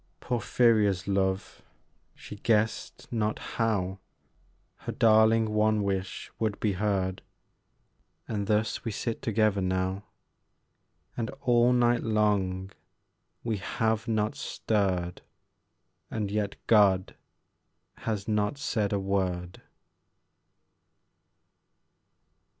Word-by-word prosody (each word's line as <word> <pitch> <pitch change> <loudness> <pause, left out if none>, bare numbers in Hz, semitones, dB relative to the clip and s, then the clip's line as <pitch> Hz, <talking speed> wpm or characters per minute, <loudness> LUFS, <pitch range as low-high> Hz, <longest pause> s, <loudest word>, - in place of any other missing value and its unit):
Porphyria's 110 -6 +2
love: 95 0 -1 0.5
she - - -10
guessed 110 +2 -1
not 110 -2 0
how 100 -5 -1 0.8
Her - - -6
darling 110 0 +4
one 105 0 +2
wish 95 -2 -3
would 110 -2 -1
be 105 - +1
heard. 95 -1 -1 1.1
And 100 -2 -3
thus 110 0 0
we 115 - -2
sit 115 +2 -3
together 110 -3 +1
now, 95 +2 -1 1.1
And 115 -2 -2
all 120 0 +4
night 120 -1 +3
long 100 -4 0 0.7
we 115 -3 -1
have 110 +3 -1
not 110 -1 0
stirred, 95 -5 -1 0.9
And 105 -3 -3
yet 105 -1 -1
God 100 -4 +4 0.8
has 105 -3 -3
not 105 +3 0
said 110 -6 -1
a 100 - +1
word! 95 -2 -2
105 Hz, 95 wpm, -28 LUFS, 95-110 Hz, 1.1 s, darling